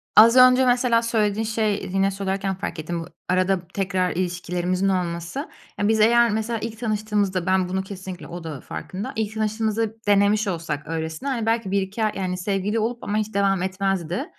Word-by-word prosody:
az 230 Hz, +3 st, +8 dB
önce 255 Hz, 0 st, +7 dB
mesela 245 Hz, -2 st, +3 dB
söylediğin 220 Hz, -2 st, 0 dB
şey 215 Hz, -3 st, -1 dB
yine 195 Hz, 0 st, +2 dB
söylerken 195 Hz, 0 st, -2 dB
fark 185 Hz, -3 st, -5 dB
ettim. 170 Hz, +2 st, -3 dB
I -, -, -11 dB, 0.2 s
arada 185 Hz, -1 st, +1 dB
tekrar 185 Hz, -2 st, 0 dB
ilişkilerimizin 180 Hz, +1 st, -1 dB
olması, 180 Hz, -, -2 dB, 0.3 s
yani, 205 Hz, -, +2 dB
biz 220 Hz, 0 st, +3 dB
eğer 235 Hz, +2 st, +5 dB
mesela 220 Hz, +1 st, -1 dB
ilk 225 Hz, 0 st, -6 dB
tanıştığımızda, 210 Hz, -5 st, 0 dB
ben, 185 Hz, -1 st, +2 dB
bunu 190 Hz, +1 st, -1 dB
kesinlikle 190 Hz, -2 st, -8 dB
O 170 Hz, 0 st, -7 dB
da 150 Hz, -5 st, -6 dB
farkında, 190 Hz, +3 st, -6 dB
ilk 220 Hz, -1 st, -2 dB
tanıştığımızda 220 Hz, 0 st, -1 dB
denemiş 205 Hz, +1 st, +3 dB
olsak 165 Hz, -5 st, -3 dB
öylesine, 160 Hz, -, -3 dB
hani, 235 Hz, -4 st, -1 dB
belki 225 Hz, -4 st, 0 dB
1-2 200 Hz, +3 st, -1 dB
ay, 215 Hz, -, +1 dB
yani, 185 Hz, -1 st, -2 dB
sevgili 200 Hz, +3 st, -1 dB
olup 235 Hz, +2 st, -2 dB
ama 210 Hz, +1 st, -1 dB
hiç 215 Hz, 0 st, -2 dB
devam 195 Hz, -2 st, +2 dB
etmezdi. 190 Hz, -, -1 dB
200 Hz, 175 wpm, -23 LUFS, 185-220 Hz, 0.3 s, az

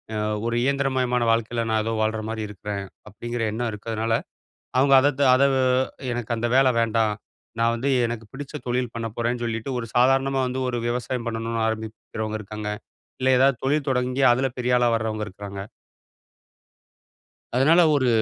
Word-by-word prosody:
அ -, -, -1 dB, 0.3 s
ஒரு 115 Hz, -, -1 dB
இயந்திரமயமான 130 Hz, -3 st, +1 dB
வாழ்க்கைல 115 Hz, +1 st, 0 dB
நான் 110 Hz, -1 st, +2 dB
ஏதோ 115 Hz, -, -2 dB
வாழுற 110 Hz, 0 st, 0 dB
மாரி 110 Hz, -1 st, -3 dB
இருக்குறேன் 100 Hz, 0 st, -5 dB, 0.2 s
அப்படிங்கிற 120 Hz, +3 st, -5 dB
எண்ணம் 115 Hz, +2 st, -2 dB
இருக்குறனால, 110 Hz, +2 st, -2 dB, 0.6 s
அவங்க 140 Hz, +1 st, +4 dB
அத 140 Hz, -, +4 dB
த் -, -, +4 dB
அத 130 Hz, -, +4 dB, 0.7 s
எனக்கு 120 Hz, -1 st, -3 dB
அந்த 120 Hz, +1 st, 0 dB
வேலை 135 Hz, -1 st, +5 dB
வேண்டாம். 110 Hz, -1 st, +1 dB, 0.5 s
நான் 115 Hz, 0 st, +3 dB
வந்து 135 Hz, +4 st, -1 dB, 0.2 s
எனக்குப் 115 Hz, -2 st, -5 dB
பிடிச்ச 140 Hz, +2 st, -8 dB
தொழில் 125 Hz, -1 st, -1 dB
பண்ணப்போறேன்னு 115 Hz, +1 st, -2 dB
சொல்லிட்டு, 115 Hz, +2 st, -3 dB
ஒரு 115 Hz, -, -5 dB
சாதாரணமா 135 Hz, +2 st, +3 dB
வந்து 130 Hz, +1 st, -3 dB
ஒரு 120 Hz, -, -2 dB
விவசாயம் 120 Hz, 0 st, -2 dB
பண்ணணும்னு 115 Hz, 0 st, -2 dB
ஆரம்பிக்குறவங்க 110 Hz, 0 st, -4 dB
இருக்காங்க. 105 Hz, +1 st, -6 dB, 0.5 s
இல்ல 130 Hz, 0 st, +3 dB
ஏதாது 135 Hz, 0 st, +4 dB
தொழில் 145 Hz, +1 st, +1 dB
தொடங்கி 125 Hz, +1 st, 0 dB
அதுல 130 Hz, +2 st, +1 dB
பெரியாளா 125 Hz, -1 st, +2 dB
வர்றவங்க 110 Hz, -1 st, -2 dB
இருக்குறாங்க. 100 Hz, 0 st, -8 dB, 2.0 s
அதனால 155 Hz, +7 st, +5 dB
ஒரு, 130 Hz, -3 st, +2 dB
120 Hz, 150 wpm, -24 LUFS, 110-130 Hz, 2.0 s, வேலை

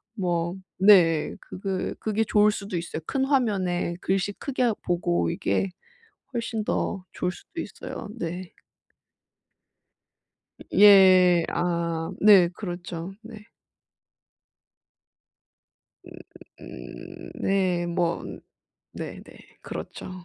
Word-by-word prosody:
뭐 175 Hz, -3 st, -1 dB, 0.2 s
네, 170 Hz, -6 st, +5 dB
그게 190 Hz, 0 st, -4 dB
그게 220 Hz, 0 st, 0 dB
좋을 210 Hz, -1 st, +4 dB
수도 200 Hz, -2 st, -6 dB
있어요. 170 Hz, -1 st, -5 dB
큰 265 Hz, +8 st, -1 dB
화면에 195 Hz, -11 st, 0 dB
글씨 195 Hz, +1 st, 0 dB
크게 265 Hz, +3 st, -3 dB
하 235 Hz, -3 st, +3 dB
보고 85 Hz, -, 0 dB
이게 100 Hz, -, -1 dB, 0.7 s
훨씬 230 Hz, -2 st, -2 dB
더 195 Hz, -2 st, -2 dB
좋을 180 Hz, -, -2 dB
수도 335 Hz, -, -9 dB
있어요. 225 Hz, -, -7 dB
네. 175 Hz, +1 st, -5 dB, 2.1 s
음 -, -, -11 dB, 0.2 s
예. 185 Hz, -4 st, +7 dB
아 170 Hz, -1 st, -1 dB
네. 195 Hz, -4 st, +7 dB
그렇죠. 175 Hz, -2 st, -6 dB
네. 215 Hz, -2 st, -12 dB, 2.6 s
음 -, -, -13 dB, 0.5 s
음 -, -, -10 dB
네. 185 Hz, -3 st, +1 dB
뭐 170 Hz, -1 st, -1 dB, 0.7 s
네네. -, -, -7 dB, 0.4 s
그렇죠. -, -, -7 dB
185 Hz, 160 characters per minute, -25 LUFS, 175-210 Hz, 2.6 s, 예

